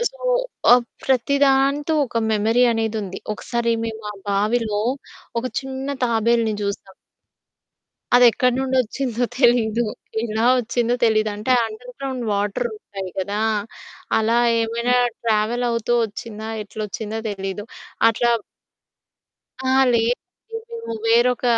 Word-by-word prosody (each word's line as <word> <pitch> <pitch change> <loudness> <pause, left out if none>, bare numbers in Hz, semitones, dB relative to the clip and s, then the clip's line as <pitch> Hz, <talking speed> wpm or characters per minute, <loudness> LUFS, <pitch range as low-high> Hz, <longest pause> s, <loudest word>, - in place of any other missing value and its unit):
అ - - 0
so, - - -19 0.5
ఆహ్, 245 0 +6 0.2
ప్రతి 265 +1 +2
దాంతో 275 +3 +2
ఒక 230 - -2
మెమరీ 225 +4 +3
అనేది 225 -1 -1
ఉంది. 190 -1 -7
ఒకసారి 235 +2 -1
మేము 225 -1 -4
మా - - -4 0.2
బావిలో 210 +1 +1 0.6
ఒక 250 - -3
చిన్న 265 0 -6 0.2
తాబేలుని 230 -1 +2
చూసాం. 200 -1 -5 1.2
అదెక్కడి 245 0 +5
నుండి 265 0 -1
వొచ్చిందో 245 0 -3 0.2
తెలీదు. 240 -2 +3 0.4
ఎలా 220 0 -1
వొచ్చిందో 240 0 0
తెలీదు. 215 -1 +2
అంటే 215 +5 -2
అండర్ 460 - -9
గ్రౌండ్ 260 -2 -4
వాటర్ 205 +4 -1
ఉంటాయి 195 -3 -7
కదా! 200 +2 -2 0.8
అలా 225 +2 +2 0.2
ఏమైనా 235 +2 0 0.3
ట్రావెల్ 225 +2 +1
అవుతూ 230 0 0
వొచ్చిందా? 220 0 -6
ఎట్లొచ్చిందో 215 +1 -5
తెలీదు 195 0 -4 0.5
అట్లా 235 +1 +1 1.3
అహా! 260 +1 +3
లేదు. 230 +1 +3 0.6
మేము 460 - -6
వేరొక 240 +2 +3
230 Hz, 115 wpm, -21 LUFS, 215-250 Hz, 1.3 s, ఆహ్